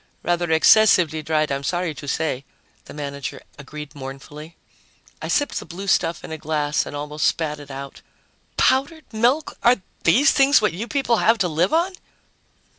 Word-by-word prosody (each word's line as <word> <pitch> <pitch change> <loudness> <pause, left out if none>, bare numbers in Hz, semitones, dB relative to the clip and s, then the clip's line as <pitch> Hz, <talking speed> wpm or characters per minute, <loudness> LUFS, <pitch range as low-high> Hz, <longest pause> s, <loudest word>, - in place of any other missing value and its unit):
"Rather 175 -1 0
excessively 160 -1 +5
dried, 155 -1 0
I'm 140 0 -2
sorry 175 +2 -1
to 145 - -10
say," 140 -3 -2 0.4
the - - -11
manager 140 -2 -6 0.2
agreed 150 +1 -9
mournfully. 145 +4 -10 0.7
I - - -4
sipped 290 - 0
the - - -10
blue 185 +4 -8
stuff 170 -3 +1
in - - -8
a 160 - -5
glass 150 -1 -1
and - - -7
almost 150 +1 -1
spat 150 -2 -1
it 145 -1 -12
out. 135 0 -8 0.6
"Powdered 285 +5 +1
milk! 245 +8 +1
Are 240 +1 +5 0.3
these 260 - +5
things 280 0 +5
what 210 -4 0
you 210 +7 -5
people 270 -5 +1
have 225 +2 +3
to 190 -4 +1
live 170 +3 0
on?" 345 +4 +1
160 Hz, 170 wpm, -22 LUFS, 150-220 Hz, 0.7 s, excessively